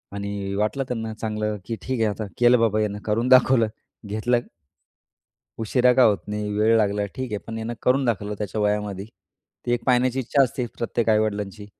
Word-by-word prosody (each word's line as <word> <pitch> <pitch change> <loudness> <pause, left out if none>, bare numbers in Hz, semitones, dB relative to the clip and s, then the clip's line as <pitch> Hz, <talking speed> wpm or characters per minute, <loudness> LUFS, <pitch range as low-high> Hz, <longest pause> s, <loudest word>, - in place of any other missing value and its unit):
आणि 100 -1 -4
वाटलं 105 +7 0
त्यांना 110 -2 -4
चांगलं 105 -1 -3
की 115 - -3
ठीक 130 -2 -3
आहे, 110 -1 +2
आता 105 +1 -4
केलं 120 0 +5
बाबा 110 -2 +2
ह्यांना 105 -1 -1
करून 110 +3 0
दाखवलं, 130 -2 +5 0.4
घेतलं 110 +4 0 1.2
उशिरा 125 +3 +3
का 130 - +5
होत 105 -4 +4
नाही, 105 0 -3
वेळ 110 +2 +3
लागला 105 -1 +1
ठीक 130 -2 -4
आहे, 105 - -1
पण 115 0 -5
याने 115 +1 -4
करून 130 +2 +2
दाखवलं 105 -3 -1
त्याच्या 105 +1 -3
वयामध्ये. 105 -2 -1 0.6
ती 120 - +1
एक 120 -1 -1
पाहण्याची 125 0 +2
इच्छा 135 +3 +2
असते 125 -1 -1
प्रत्येक 115 -1 -1
आई-वडिलांची, 105 -1 0
110 Hz, 180 wpm, -23 LUFS, 105-120 Hz, 1.2 s, केलं